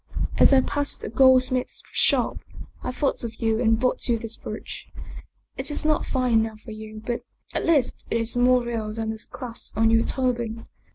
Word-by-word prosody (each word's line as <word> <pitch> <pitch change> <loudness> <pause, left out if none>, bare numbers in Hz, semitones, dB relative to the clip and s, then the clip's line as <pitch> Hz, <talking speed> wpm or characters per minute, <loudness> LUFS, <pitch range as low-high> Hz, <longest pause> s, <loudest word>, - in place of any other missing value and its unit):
As - - +7
I 270 -1 +6
passed 285 +2 -2
the - - -5
gold 260 +2 +5
smith's 255 -1 -2
shop, - - +2 0.4
I - - -3
thought 270 +1 -1
of 225 -1 -5
you 225 -1 +1
and 225 -2 +3
bought 255 0 0
you 235 - +3
this 230 0 -1
brooch. - - -8 0.7
It 265 +3 +1
is 295 - +1
not 305 -1 +1
fine 250 -4 +2
enough 220 -1 -3
for 225 - -10
you, 215 0 -9
but 240 -1 -2 0.3
at - - -2
least 300 -7 +1
it - - +1
is 230 +1 +2
more 250 0 +4
real 225 -3 -3
than 225 -1 -2
the 220 0 -7
clasp 235 -4 -5
on 225 0 +4
your 225 0 +4
turban. 240 -3 -2
235 Hz, 195 wpm, -24 LUFS, 225-255 Hz, 0.7 s, As